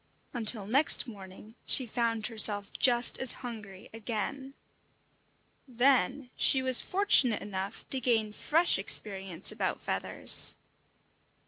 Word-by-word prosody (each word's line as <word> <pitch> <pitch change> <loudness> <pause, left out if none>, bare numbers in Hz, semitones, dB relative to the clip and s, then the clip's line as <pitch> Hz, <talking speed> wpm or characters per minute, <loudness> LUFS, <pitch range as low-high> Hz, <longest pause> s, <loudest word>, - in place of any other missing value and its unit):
Until 220 -3 -1
next 270 +5 +3
morning 200 0 -15
she 260 - +1
found 230 -1 -4
herself 210 -3 +2
just 240 -1 +1
as 260 - +5
hungry 205 -5 -12
again. 235 +5 -8 1.1
Then 255 0 -2
she 265 -1 +1
was 260 -1 +8
fortunate 325 - +2
enough 200 +1 -8
to 265 - 0
gain 225 -3 -2
fresh 325 - +1
experience 195 -3 -2
about - - -5
feathers. - - 0
230 Hz, 110 wpm, -27 LUFS, 205-260 Hz, 1.1 s, was